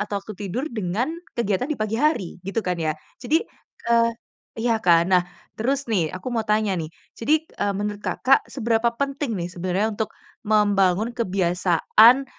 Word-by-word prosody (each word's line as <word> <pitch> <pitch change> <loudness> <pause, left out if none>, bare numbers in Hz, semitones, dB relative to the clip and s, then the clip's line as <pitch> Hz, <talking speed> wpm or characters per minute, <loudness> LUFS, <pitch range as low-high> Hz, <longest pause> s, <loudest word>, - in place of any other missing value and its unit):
atau 210 -1 -2
waktu 200 +2 -6 0.2
tidur, 250 - -2
dengan, 215 - -1 0.2
kegiatan 235 +2 0
di 305 - -1
pagi 215 +1 -2
hari, 280 - 0
gitu 195 +4 -3
kan 180 -2 -1
ya. 155 -1 -1 0.2
Jadi, 305 - +1 0.4
eee 230 0 +3 0.5
iya 225 -1 +1
kan, 170 -1 +5
nah, 180 - +6 0.3
terus 270 +5 -1
nih, 195 - 0
aku 240 +7 -5
mau 230 - +1
tanya 210 -1 +2
nih, 155 - -5 0.2
jadi, 305 +7 +1
e 205 - -5
menurut 205 0 -3
Kakak, 265 +5 +3
seberapa 235 -2 +1
penting 275 -3 -2
nih 175 0 -4
sebenarnya 185 +5 -1
untuk 215 +1 -2 0.4
membangun 205 0 +3
kebiasaan 195 +4 +4
215 Hz, 160 wpm, -23 LUFS, 185-240 Hz, 0.5 s, nah